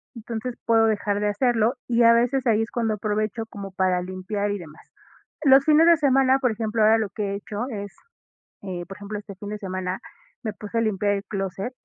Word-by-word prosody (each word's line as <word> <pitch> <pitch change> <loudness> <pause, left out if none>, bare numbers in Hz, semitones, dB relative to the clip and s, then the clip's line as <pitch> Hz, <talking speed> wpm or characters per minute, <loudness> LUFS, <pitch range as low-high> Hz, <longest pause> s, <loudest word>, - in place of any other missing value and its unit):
Entonces, 230 +1 -5
puedo 225 -1 +4
dejar 205 -1 0
de 210 - 0
hacerlo, 230 +1 +2
y 240 -1 +3
a 230 0 +7
veces 245 +3 +1
ahí 220 -1 +3
es 225 - -3
cuando 225 -2 0
aprovecho 215 +1 -2
como 200 -3 -8
para 185 -1 +1
limpiar 185 +3 -3
y 205 - -3
demás. 155 -3 -14 0.5
Los 270 -1 +6
fines 315 +2 +5
de 340 -1 +7
semana, 270 -2 +3
por 250 -3 +1
ejemplo, 220 0 -1
ahora 220 +1 +6
lo 220 -2 -1
que 200 0 -3
he - - -2
hecho 210 +3 -5
es, 200 -4 -6 0.7
eh, 180 -3 -5
por 195 - -9
ejemplo, 205 +1 -6
este 205 -1 -10
fin 205 +2 -8
de 210 - -4
semana 185 -1 -4 0.4
me 215 -2 -3
puse 210 +3 -6
a - - +2
limpiar 205 -2 +1
el 200 -1 -3
clóset. 195 +4 -4
215 Hz, 215 wpm, -24 LUFS, 200-230 Hz, 0.7 s, a